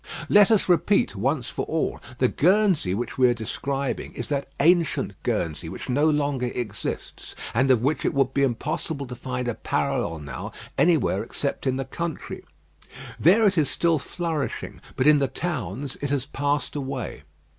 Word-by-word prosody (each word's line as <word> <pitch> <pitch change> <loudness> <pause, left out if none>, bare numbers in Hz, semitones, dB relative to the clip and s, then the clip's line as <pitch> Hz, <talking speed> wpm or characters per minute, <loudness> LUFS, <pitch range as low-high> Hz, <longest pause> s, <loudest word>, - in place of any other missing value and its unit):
Let 205 -1 +7
us 220 -3 +3
repeat 180 - +3
once 125 +5 0
for - - -3
all, 160 0 -1 0.2
the 130 - +3
Guernsey 180 - +3
which 120 +4 -4
we 125 -1 +6
are 120 - +2
describing 135 +4 -3
is 120 - -6
that 140 -2 -1
ancient 165 - +3
Guernsey 85 -8 -2
which - - -7
no 145 +5 +3
longer 145 -4 0
exists, 120 -4 -5 0.2
and 130 +4 +2
of 125 -3 +4
which 145 +4 +1
it - - +2
would 135 -1 +2
be 140 - +1
impossible 140 +3 -1
to 125 -1 -7
find 125 0 -4
a 120 - 0
parallel 85 -5 -1
now 75 -2 -7 0.2
anywhere - - +3
except - - -3
in 130 - +2
the 135 0 -2
country. 170 +4 -5 0.8
There 200 +8 +5
it 195 -4 +4
is 150 - +2
still 165 -2 +2
flourishing, 160 0 -4
but 130 - +1
in 150 -1 +7
the 135 - +2
towns 135 - -4
it 145 - -2
has 140 -2 0
passed 145 0 -1
away. 135 -3 -4
140 Hz, 170 wpm, -25 LUFS, 125-155 Hz, 0.8 s, Let